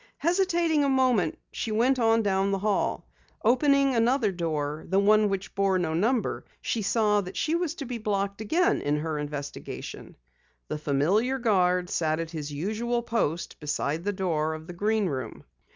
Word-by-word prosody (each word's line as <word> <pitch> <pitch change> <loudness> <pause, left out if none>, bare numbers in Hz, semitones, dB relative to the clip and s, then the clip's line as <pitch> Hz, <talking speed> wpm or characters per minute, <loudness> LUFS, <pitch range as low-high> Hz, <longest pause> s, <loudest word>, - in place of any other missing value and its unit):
Hesitating 340 -3 +2
a 280 - +2
moment 255 -10 +2
she 225 - -4
went 250 +5 +2
on 225 -1 +3
down 195 -1 +1
the 195 - +1
hall. 205 +1 -1 0.4
Opening 275 +3 +4
another 235 -1 +2
door, 155 -4 -3
the 190 - +2
one 210 +1 +4
which 195 0 -4
bore 195 -1 +2
no 165 -3 -1
number, 225 +8 0 0.2
she 230 - -2
saw 210 0 +2
that 185 -1 -8
she 315 - 0
was 335 -2 -1
to 280 - -6
be 240 -1 -5
blocked 200 -1 -2
again 330 - +2
in 145 +1 0
her 155 0 -2
investigation. 145 -1 -6 0.5
The 150 - -3
familiar 175 - +1
guard 180 -7 +2
sat 155 -1 0
at 165 -1 -4
his 150 -3 -5
usual 220 +10 -2
post 175 -8 -2
beside 150 +1 -2
the 205 - 0
door 160 -5 -1
of 155 0 -9
the 175 - -8
Green 210 +3 +1
Room. 130 -9 -4
200 Hz, 170 wpm, -27 LUFS, 165-235 Hz, 0.5 s, Opening